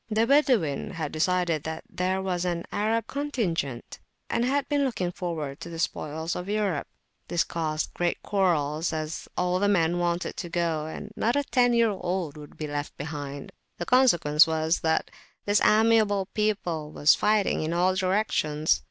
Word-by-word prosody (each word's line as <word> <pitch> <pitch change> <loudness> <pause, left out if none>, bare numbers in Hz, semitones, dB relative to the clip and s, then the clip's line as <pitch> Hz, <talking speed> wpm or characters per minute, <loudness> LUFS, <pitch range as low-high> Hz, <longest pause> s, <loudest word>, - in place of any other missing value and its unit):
The 220 +1 +2
Badawin 245 - +2
had 160 -4 -4
decided 170 -1 +1
that 160 +2 -5
there 185 +1 -1
was 180 -2 -1
to 180 - -1
be - - +1
an 170 0 -5
"Arab 225 +2 0
contingent," 200 - -3 0.3
and 235 - +1
had 275 +3 +1
been 290 -1 +1
looking 190 -10 -1
forward 160 -6 -4
to - - -8
the 165 - -7
spoils 160 0 -2
of 180 +2 -5
Europe: 205 -7 -1 0.4
this 175 - +1
caused 155 -2 -2 0.3
quarrels, 165 -5 +1
as 155 0 -4
all 180 0 +1
the 205 - +2
men 175 -3 +2
wanted 175 0 -1
to 175 - -5
go, 165 -3 -1
and 160 - -7
not 235 +3 +1
a 285 - +2
ten 245 -3 +2
year 230 -2 +4
old 180 -5 -3
would 150 -1 -12
be 155 - -4
left 145 0 -5
behind. 145 -1 -6 0.3
The 175 - -4
consequence 175 - +5
was, 160 +1 +1
that 160 0 0 0.3
this 205 0 +3
amiable 215 -3 +4
people 180 -8 -1
was 150 0 +5
fighting 210 -1 +2
in 155 +1 -2
all 180 +2 +2
directions. 185 - +1
175 Hz, 170 wpm, -26 LUFS, 155-210 Hz, 0.4 s, consequence